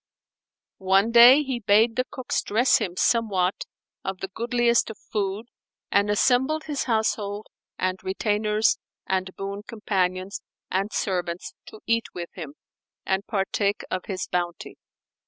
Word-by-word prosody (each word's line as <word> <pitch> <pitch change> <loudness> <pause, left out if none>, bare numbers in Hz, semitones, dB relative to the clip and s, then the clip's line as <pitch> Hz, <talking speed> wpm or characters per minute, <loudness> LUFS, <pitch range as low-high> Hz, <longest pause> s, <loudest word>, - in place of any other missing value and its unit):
One 195 +4 +3
day, 245 +5 +8
he 260 -3 -3
bade 220 +2 +3
the 255 - 0
cooks 255 -2 -2
dress 235 +5 +3
him 185 -6 -3
somewhat 200 -6 +1 0.4
of 190 0 -3
the 190 - -5
goodliest 235 +3 +1
of 220 - -8
food 205 +1 -3 0.5
and 200 +1 +3
assembled 260 +8 +2
his 295 -3 -3
household 215 -3 -1 0.3
and 185 0 -1
retainers 210 +3 +1 0.3
and 190 0 -1
boon 200 +1 -5
companions 190 -4 -2 0.3
and 195 +3 0
servants 180 -3 -2
to 215 - -12
eat 230 0 +1
with 175 -1 -5
him, 150 -5 -8 0.5
and 190 +1 -1
partake 200 0 -1
of 185 - -2
his 190 -2 -3
bounty. 175 -1 -4
205 Hz, 135 wpm, -25 LUFS, 190-230 Hz, 0.5 s, day